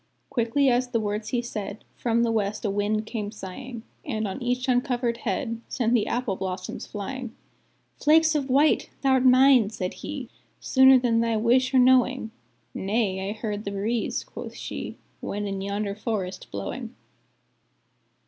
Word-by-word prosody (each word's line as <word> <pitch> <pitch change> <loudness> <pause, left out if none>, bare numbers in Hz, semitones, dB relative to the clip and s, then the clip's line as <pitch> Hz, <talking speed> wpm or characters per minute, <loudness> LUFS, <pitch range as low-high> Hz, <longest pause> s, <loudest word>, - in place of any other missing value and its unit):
Quickly 250 +2 +2
as 250 0 +3
the 240 -2 0
words 210 0 -2
he 245 -1 0
said, 210 -3 -6
From 235 -1 +1
the 230 - +1
west 215 0 -1
a 205 - +1
wind 210 +2 0
came 215 -3 -4
sighing, 225 +4 -8 0.2
And 220 -6 -2
on 195 +7 -5
each 250 +1 -1
uncovered 245 -2 +1
head 230 -1 -3
Sent 240 -2 0
the 230 -4 +2
apple 240 -5 -1
blossoms 185 -1 -5
flying; 240 +3 -6 0.7
"'Flakes 315 +1 +5
of 285 -3 -1
white!' 285 +4 +3
thou'rt 265 -1 +4
mine," 255 -3 +6
said 185 -4 -4
he, 280 -5 -5 0.3
"Sooner 265 0 +6
than 240 -2 +2
thy 230 -1 +1
wish 245 +4 +3
or 265 - +3
knowing!" 255 -2 +4 0.4
"Nay, 195 -2 -1
I - - -2
heard 210 -1 -4
the 200 - -3
breeze," 210 +4 -1
quoth - - -9
she, - - -6 0.2
"When 205 +1 -3
in 195 -1 -3
yonder 200 +1 -2
forest 200 -3 -4
blowing." 100 -1 -5
230 Hz, 160 wpm, -26 LUFS, 205-255 Hz, 0.7 s, mine